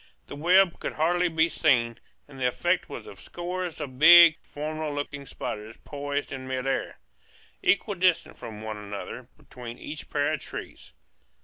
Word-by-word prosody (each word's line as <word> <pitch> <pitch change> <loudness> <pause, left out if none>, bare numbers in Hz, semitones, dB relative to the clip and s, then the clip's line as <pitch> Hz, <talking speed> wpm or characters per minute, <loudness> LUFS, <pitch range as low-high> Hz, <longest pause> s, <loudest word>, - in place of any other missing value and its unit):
The - - -9
webs 175 +4 +4
could - - -4
hardly 175 +3 +2
be 160 -1 +2
seen; 120 -9 +2 0.3
and 135 -2 -13
the 125 - +2
effect 125 - 0
was - - -7
of 100 - -12
scores 175 - -5
of 130 -4 -7
big, 170 0 +9
formidable 155 0 -5
looking 145 -1 -5
spiders 110 +1 -6
poised 145 0 -4
in 130 -1 -6
midair, 130 +1 -2 0.6
equidistant 185 -3 +2
from 110 -2 -9
one 110 -1 -5
another, 105 +4 -7
between 120 -1 -10
each 150 +3 -8
pair 145 +1 +1
of 155 - -2
trees. - - -9
145 Hz, 150 wpm, -27 LUFS, 125-165 Hz, 0.6 s, big